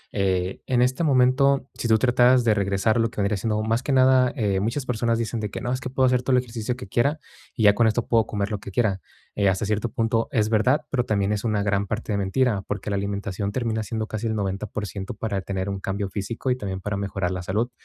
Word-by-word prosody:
eh, 95 Hz, -2 st, 0 dB
en 125 Hz, -1 st, +3 dB
este 130 Hz, +6 st, 0 dB
momento, 135 Hz, -1 st, +3 dB
si 120 Hz, -, -4 dB
tú 110 Hz, -, +5 dB
trataras 125 Hz, +1 st, +4 dB
de 115 Hz, -, +4 dB
regresar 100 Hz, +3 st, +1 dB
lo 115 Hz, -, +2 dB
que -, -, -9 dB
vendría 100 Hz, +1 st, +1 dB
siendo 105 Hz, +2 st, -1 dB
más 115 Hz, +3 st, 0 dB
que 140 Hz, -, -3 dB
nada, 130 Hz, -1 st, +5 dB
eh, 100 Hz, -6 st, 0 dB
muchas 115 Hz, +7 st, -2 dB
personas 115 Hz, -1 st, 0 dB
dicen 115 Hz, 0 st, -2 dB
de 105 Hz, -2 st, -3 dB
que: -, -, -6 dB
"No, 120 Hz, -, -3 dB
es 130 Hz, -, -2 dB
que -, -, -4 dB
puedo 130 Hz, 0 st, +2 dB
hacer 125 Hz, -1 st, +3 dB
todo 125 Hz, +1 st, +1 dB
el 125 Hz, -, +2 dB
ejercicio 115 Hz, 0 st, -4 dB
que 125 Hz, -5 st, -9 dB
quiera, 140 Hz, +9 st, +1 dB, 0.4 s
y 115 Hz, -, -1 dB
ya 105 Hz, -1 st, +7 dB
con 115 Hz, +1 st, +3 dB
esto 110 Hz, +2 st, 0 dB
puedo 115 Hz, -2 st, +3 dB
comer 100 Hz, 0 st, -2 dB
lo 105 Hz, -, -2 dB
que 100 Hz, -, -9 dB
quiera". 100 Hz, -2 st, 0 dB, 0.3 s
Eh, 100 Hz, -2 st, +2 dB
hasta 95 Hz, +3 st, -1 dB
cierto 105 Hz, +3 st, -1 dB
punto, 115 Hz, +1 st, 0 dB
es 110 Hz, -4 st, +1 dB
verdad, 130 Hz, +7 st, +2 dB
pero 125 Hz, -3 st, +1 dB
también 100 Hz, -3 st, 0 dB
es 105 Hz, +1 st, -3 dB
una 105 Hz, -3 st, 0 dB
gran 100 Hz, -1 st, 0 dB
parte 110 Hz, +1 st, -3 dB
de 100 Hz, -, 0 dB
mentira, 100 Hz, +1 st, +1 dB
porque 100 Hz, 0 st, -4 dB
la -, -, 0 dB
alimentación 100 Hz, 0 st, -3 dB
termina 110 Hz, -1 st, -1 dB
siendo 110 Hz, 0 st, -3 dB
casi 110 Hz, +1 st, -4 dB
el 110 Hz, -, -1 dB
90% 100 Hz, 0 st, -4 dB
para 100 Hz, -2 st, -2 dB
tener 95 Hz, +1 st, -3 dB
un 100 Hz, -1 st, -3 dB
cambio 100 Hz, +1 st, -3 dB
físico 110 Hz, +6 st, -3 dB
y 125 Hz, -, +2 dB
también 95 Hz, -3 st, -4 dB
para 100 Hz, +1 st, -3 dB
mejorar 95 Hz, -2 st, -2 dB
la 90 Hz, -, -3 dB
salud. 105 Hz, +7 st, -1 dB
110 Hz, 250 wpm, -24 LUFS, 100-125 Hz, 0.4 s, ya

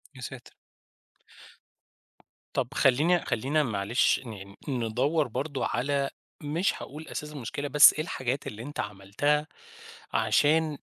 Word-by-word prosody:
يا 125 Hz, -, -11 dB
ساتر. 125 Hz, 0 st, -9 dB, 2.0 s
طَب -, -, 0 dB
خلّينا 150 Hz, +7 st, +3 dB
خلّينا 145 Hz, +7 st, +1 dB
معلش 110 Hz, 0 st, +2 dB
يعني 100 Hz, -5 st, -10 dB
ن -, -, -2 dB
ندوَّر 140 Hz, +7 st, +1 dB
برضه 140 Hz, +3 st, -3 dB
على 140 Hz, +1 st, 0 dB, 0.3 s
مش 165 Hz, +6 st, 0 dB
هاقول 155 Hz, +3 st, -9 dB
أساس 150 Hz, 0 st, -5 dB
المشكلة، 145 Hz, +1 st, -4 dB
بس 150 Hz, 0 st, +8 dB
إيه 155 Hz, -, -2 dB
الحاجات 130 Hz, -5 st, -3 dB
اللي 110 Hz, +2 st, -7 dB
أنت 145 Hz, +2 st, -8 dB
عملتها 105 Hz, +10 st, 0 dB, 0.7 s
عشان 155 Hz, 0 st, +2 dB
140 Hz, 120 wpm, -28 LUFS, 120-150 Hz, 2.0 s, بس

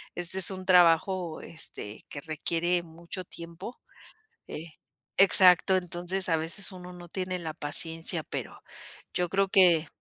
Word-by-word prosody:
Este 175 Hz, +2 st, -2 dB
es 190 Hz, -, +5 dB
un 185 Hz, -1 st, -7 dB
trabajo, 175 Hz, -1 st, +3 dB
este, 110 Hz, -9 st, -7 dB
que 145 Hz, -, -7 dB
requiere 165 Hz, +3 st, -1 dB
mucho 170 Hz, +3 st, -8 dB
tiempo. 170 Hz, +7 st, -9 dB, 0.7 s
Eh, 160 Hz, +1 st, -8 dB, 0.5 s
exacto. 190 Hz, -1 st, +6 dB
Entonces, 180 Hz, +1 st, -2 dB
a 165 Hz, -, +3 dB
veces 165 Hz, +6 st, -2 dB
uno 180 Hz, -1 st, -10 dB
no 175 Hz, -1 st, -11 dB
tiene 185 Hz, 0 st, -3 dB
la 160 Hz, -2 st, -5 dB
paciencia, 165 Hz, +2 st, -2 dB
pero, -, -, -6 dB, 0.5 s
yo 180 Hz, -1 st, -1 dB
creo 195 Hz, +2 st, +1 dB
que. 175 Hz, -5 st, +5 dB
175 Hz, 140 wpm, -28 LUFS, 165-185 Hz, 0.7 s, exacto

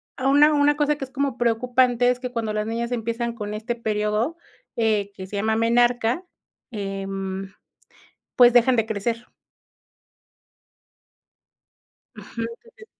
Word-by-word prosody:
a 260 Hz, -, -2 dB
una 295 Hz, +2 st, +6 dB
una 290 Hz, 0 st, +3 dB
cosa 300 Hz, 0 st, +2 dB
que 275 Hz, -, -5 dB
es -, -, -19 dB
como 275 Hz, -2 st, -2 dB
preocupante 245 Hz, +1 st, +2 dB
es 250 Hz, -, -3 dB
que 250 Hz, -1 st, -5 dB
cuando 225 Hz, -3 st, -2 dB
las 210 Hz, 0 st, -2 dB
niñas 235 Hz, +1 st, -3 dB
empiezan 235 Hz, 0 st, -2 dB
con 210 Hz, -2 st, -5 dB
este 220 Hz, +3 st, -3 dB
periodo, 215 Hz, +6 st, -1 dB, 0.4 s
eh, 215 Hz, -3 st, +1 dB
que 190 Hz, -, -7 dB
se 205 Hz, -, -8 dB
llama 220 Hz, +2 st, +1 dB
menarca, 240 Hz, +4 st, +2 dB, 0.5 s
em, 195 Hz, -2 st, -5 dB, 0.8 s
pues 245 Hz, -1 st, +7 dB
dejan 245 Hz, +1 st, +5 dB
de 225 Hz, -2 st, +1 dB
crecer. 230 Hz, +2 st, -3 dB, 2.9 s
Ujú, 230 Hz, -, -6 dB
eh 230 Hz, -, -8 dB
eh. 435 Hz, -, -13 dB
230 Hz, 140 wpm, -23 LUFS, 215-250 Hz, 2.9 s, pues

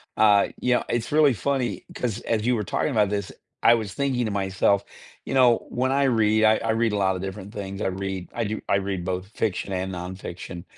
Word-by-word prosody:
uh, 105 Hz, -2 st, +5 dB
you 125 Hz, -, +2 dB
know, -, -, 0 dB
it's 120 Hz, +2 st, -2 dB
really 150 Hz, -3 st, +5 dB
funny, 120 Hz, -1 st, -1 dB
'cause 120 Hz, -2 st, -3 dB
as 110 Hz, -1 st, -1 dB
you 125 Hz, 0 st, +3 dB
were 105 Hz, -, -1 dB
talking 145 Hz, -, -1 dB
about 105 Hz, -5 st, +2 dB
this, 100 Hz, -2 st, -3 dB, 0.3 s
I 120 Hz, -, +7 dB
was 105 Hz, -3 st, -4 dB
thinking 130 Hz, -4 st, 0 dB
to 110 Hz, -, -2 dB
myself, 100 Hz, 0 st, +1 dB, 0.4 s
you -, -, -4 dB
know, 125 Hz, -3 st, +4 dB
when 130 Hz, +2 st, 0 dB
I 140 Hz, +1 st, +2 dB
read, 110 Hz, -3 st, +3 dB
I 110 Hz, 0 st, +5 dB
I 115 Hz, -, -4 dB
read 115 Hz, -1 st, +1 dB
a 105 Hz, -, 0 dB
lotta 95 Hz, -2 st, +1 dB
different 95 Hz, +1 st, -7 dB
things, 100 Hz, 0 st, -6 dB
I -, -, 0 dB
read 95 Hz, -1 st, -4 dB
I 115 Hz, -, -1 dB
do 110 Hz, +1 st, -3 dB
I -, -, +4 dB
read 95 Hz, -2 st, -2 dB
both 90 Hz, +1 st, -3 dB
fiction 100 Hz, -2 st, -2 dB
and 95 Hz, +1 st, -2 dB
nonfiction, 90 Hz, -1 st, -7 dB
105 Hz, 225 wpm, -25 LUFS, 95-120 Hz, 0.4 s, I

